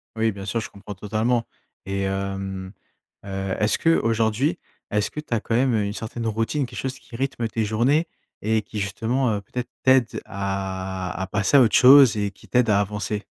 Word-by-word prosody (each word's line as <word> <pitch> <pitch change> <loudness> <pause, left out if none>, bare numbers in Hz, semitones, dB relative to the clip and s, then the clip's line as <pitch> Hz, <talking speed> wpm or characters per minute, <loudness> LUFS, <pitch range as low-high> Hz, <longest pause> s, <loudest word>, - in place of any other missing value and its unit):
Oui, 110 0 +1
bien 100 -1 -8
sûr, 105 +3 -1
je 110 - -6
comprends 100 0 -10
totalement 110 +4 0 0.4
et 95 0 -2
hem, 95 -1 -3 0.5
heu, 95 -1 -3
est-ce 105 0 +2
qu'aujourd'hui, 115 +1 +1 0.3
est-ce 105 -2 0
que - - -6
tu 150 - -5
as 115 - +2
quand 115 - -2
même, 130 +1 +3
heu, 105 - +1
une 100 0 -3
certaine 115 +1 -5
routine? 115 +6 0
Quelque 120 -1 -8
chose 130 0 -3
qui 115 - -13
rythme 125 -2 -2
tes 110 0 -2
journées 125 +10 +2 0.3
et 110 +1 +1
qui 105 +1 -6
justement, 110 +6 0
heu, 100 - -3
peut-être 125 +5 -5
t'aide 130 -4 +3
à 95 -1 -4
à 95 - -2
passer 105 +8 +2
à - - +8
autre 115 -4 +4
chose 130 -3 +8
et 100 -1 -1
qui 100 - -19
t'aide 125 -2 +2
à 100 -1 +4
avancer? 105 +1 -3
110 Hz, 195 wpm, -23 LUFS, 100-120 Hz, 0.5 s, à